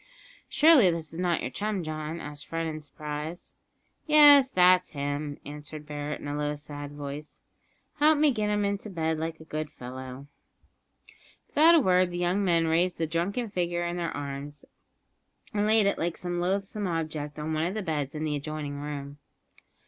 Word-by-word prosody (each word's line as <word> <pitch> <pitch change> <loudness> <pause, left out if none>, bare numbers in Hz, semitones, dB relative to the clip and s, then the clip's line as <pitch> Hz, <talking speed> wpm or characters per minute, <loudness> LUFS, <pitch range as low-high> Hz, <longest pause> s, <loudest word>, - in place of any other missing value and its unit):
"Surely 300 - +6
this 165 -2 -3
is 165 - -6
not 175 -2 +1
your 125 - -4
chum, 205 +6 -2
John?" 155 +1 -4
asked 145 -2 -8
Fred 165 0 -2
in 155 -1 -4
surprise. 150 +3 -6 0.5
"Yes, 290 -3 +8
that's 180 -2 +4
him," 145 0 -3
answered 150 +1 -8
Barret 150 0 -4
in - - -6
a 145 - -3
low 150 0 -1
sad 145 0 -8
voice. 145 +1 -7 0.6
"Help 305 +1 +5
me 300 0 +4
to - - +1
get 210 -2 -1
him 210 0 +1
into 200 +1 -2
bed, 160 -3 -1
like 160 0 -4
a - - -11
good 155 -1 -4
fellow." 130 -1 -8 1.2
Without 325 +3 +6
a - - +7
word 185 -6 +3
the 175 - -5
young 180 +3 +1
men 170 -3 +3
raised 170 +3 +2
the 165 - 0
drunken 190 +8 -2
figure 175 -2 -1
in 175 +1 -3
their 170 -1 -1
arms, 145 0 -6 0.9
and 210 0 +1
laid 220 -1 +4
it 200 - +1
like 170 0 -1
some 175 -2 -3
loathsome 195 +3 -1
object 155 -3 -3
on 155 +1 -3
one 155 +2 +1
of 185 - -4
the 215 - -2
beds 150 -4 -2
in 155 - -3
the 150 -1 -1
adjoining 145 -1 -5
room. 145 -1 -6
160 Hz, 185 wpm, -28 LUFS, 150-185 Hz, 1.2 s, Yes